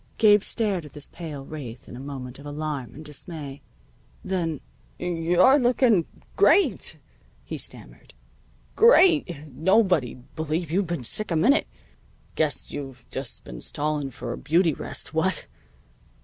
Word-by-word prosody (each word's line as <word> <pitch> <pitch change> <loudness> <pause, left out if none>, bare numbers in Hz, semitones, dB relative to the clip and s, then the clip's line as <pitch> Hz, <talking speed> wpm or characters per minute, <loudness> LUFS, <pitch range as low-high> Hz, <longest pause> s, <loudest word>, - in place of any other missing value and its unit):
Gabe 210 -2 +7
stared 205 -5 -1
at 150 - -12
this 145 -1 -8
pale 150 -5 -7
wraith 130 -7 -8
in - - -9
a - - -8
moment 135 -2 -7
of 140 - -12
alarm 145 -5 -4
and 155 +2 -10
dismay. 150 -1 -5 0.6
Then: 170 -6 -1 0.4
"You're 180 - +4
looking 240 - +3 0.3
great!" 400 - +3 0.5
he - - -5
stammered. - - -7 0.6
"Great! 315 - +5
Nobody'd 160 - +1
believe 160 +1 -2
you'd 190 +2 +1
been 170 -6 -3
sick 215 - -2
a 170 - 0
minute. 235 - +4 0.7
Guess 155 -2 -1
you've 135 -4 -7
just 135 -2 -4
been - - -9
stalling 150 -1 -2
for 130 - -6
a - - -7
beauty 165 +1 +3
rest, - - -7
what?" - - 0
155 Hz, 135 wpm, -25 LUFS, 140-185 Hz, 0.7 s, Gabe